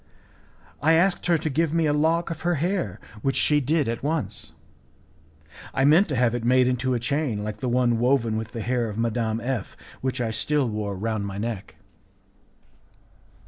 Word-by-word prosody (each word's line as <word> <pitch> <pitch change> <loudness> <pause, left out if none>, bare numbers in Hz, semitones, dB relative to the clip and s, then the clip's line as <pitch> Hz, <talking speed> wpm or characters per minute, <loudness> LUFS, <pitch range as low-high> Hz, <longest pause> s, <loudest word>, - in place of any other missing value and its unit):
I 160 +4 +4
asked 175 +3 +2
her 170 -1 +4
to 155 - -4
give 155 +2 0
me 165 -1 +2
a 145 - +2
lock 165 +3 +1
of 160 - -6
her 175 0 +1
hair, 180 +5 -1 0.2
which 135 +2 0
she 150 -1 +3
did 150 +1 +1
at 115 0 -2
once. 155 +1 -3 1.2
I 135 0 +3
meant 165 +7 +5
to 140 - -1
have 120 -1 +2
it 120 -1 -2
made 125 +1 +4
into 125 0 0
a - - 0
chain 125 -3 -1
like 105 0 -5
the 125 - -2
one 120 -1 +2
woven 120 -3 +2
with 110 0 -4
the 115 - -5
hair 120 -1 0
of 105 - -7
Madame 115 -1 0
F, 120 -3 -4 0.2
which 130 0 -2
I 115 -2 -1
still 140 +5 +1
wore 105 -3 -3
round 110 0 -2
my 100 0 -6
neck. 100 -7 -5
125 Hz, 185 wpm, -25 LUFS, 115-150 Hz, 1.2 s, meant